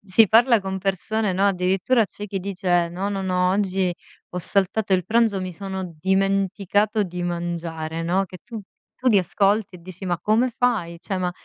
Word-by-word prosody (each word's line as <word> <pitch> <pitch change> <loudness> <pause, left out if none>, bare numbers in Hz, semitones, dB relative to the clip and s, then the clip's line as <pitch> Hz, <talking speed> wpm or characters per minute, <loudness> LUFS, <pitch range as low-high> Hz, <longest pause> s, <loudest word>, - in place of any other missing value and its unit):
si 205 +3 +4
parla 230 +1 +5
con 190 0 -4
persone, 195 +2 -1
no, 195 +2 +2
addirittura 195 +5 +2
c'è 205 +2 -8
chi 195 -1 -3
dice: 180 -2 0
"No, 185 +4 -3
no, 195 -1 -3
no, 180 -1 +1
oggi 190 -2 0 0.4
ho 180 - -4
saltato 195 +3 +1
il 185 -2 +2
pranzo, 225 -2 +2
mi 185 -1 -4
sono 190 -2 -6
dimenticato 195 +3 +1
di 180 -2 -5
mangiare", 170 -2 -3
no, 180 +4 +1
che 185 -1 -11
tu 230 -2 -7 0.4
tu 255 - +1
li 215 -4 +5
ascolti 195 +2 +1
e - - -16
dici: 185 +2 -10
"Ma 175 -2 -1
come 225 +4 +2
fai?" 205 -9 0
Ceh 190 +1 -3
ma 180 -1 -1
190 Hz, 185 wpm, -23 LUFS, 180-205 Hz, 0.4 s, parla